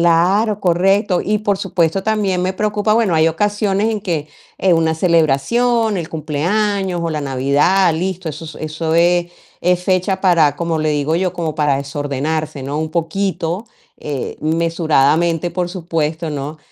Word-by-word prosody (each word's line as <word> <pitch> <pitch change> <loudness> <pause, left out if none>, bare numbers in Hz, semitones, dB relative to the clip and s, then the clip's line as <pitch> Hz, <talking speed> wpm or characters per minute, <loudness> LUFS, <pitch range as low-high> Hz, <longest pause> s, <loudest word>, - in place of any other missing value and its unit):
claro, 190 +6 +3
correcto. 190 +2 +2
Y 210 +1 0
por 205 -2 0
supuesto, 190 -2 0
también 205 -4 0
me 185 +1 0
preocupa 210 +1 0
bueno, 220 -6 +2
hay 160 0 +4
ocasiones 205 +4 0
en 215 -2 -2
que, 165 -7 -3 0.3
eh, 190 - +3
una 160 -1 +1
celebración, 185 - +2
el 165 -2 -5
cumpleaños 180 +5 -1
o 165 - -1
la 155 -1 -2
Navidad, 145 +7 +2
listo, 180 +1 -3
eso 155 +1 -9
eso 155 +1 -3
es 175 +1 +3 0.3
es 180 0 +1
fecha 190 +1 +1
para, 165 -7 +3
como 170 -1 -1
le 155 0 0
digo 150 +1 0
yo, 180 0 0
como 165 -4 -3
para 150 -3 +1
desordenarse, 145 +2 -3
¿no? 140 +2 -3
Un 155 0 -2
poquito, 175 +2 -2 0.3
eh, 145 -3 -5
mesuradamente, 165 0 +1
por 175 0 -1
supuesto, 165 -3 -3
¿no? 145 +1 -5
170 Hz, 155 wpm, -18 LUFS, 155-190 Hz, 0.3 s, hay